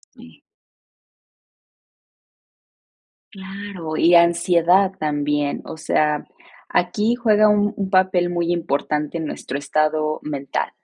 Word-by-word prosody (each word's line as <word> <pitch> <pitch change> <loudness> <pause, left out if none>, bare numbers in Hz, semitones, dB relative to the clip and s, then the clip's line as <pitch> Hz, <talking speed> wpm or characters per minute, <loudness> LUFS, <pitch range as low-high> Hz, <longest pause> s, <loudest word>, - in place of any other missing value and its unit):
Sí. - - -16 2.9
Claro, 190 -4 -7
y 170 +2 +4
ansiedad 175 +2 +4
también. 145 -1 -1
O - - -8
sea, 150 -1 0 0.4
aquí 210 +6 0
juega 215 -3 +3
un 210 0 +2
un 195 -2 -3
papel 185 -2 +2
muy 175 0 -1
importante 150 -1 -2
en 160 - -4
nuestro 140 -2 -5
estado 155 +1 -1
mental. 140 -2 -4
170 Hz, 100 wpm, -21 LUFS, 155-190 Hz, 2.9 s, y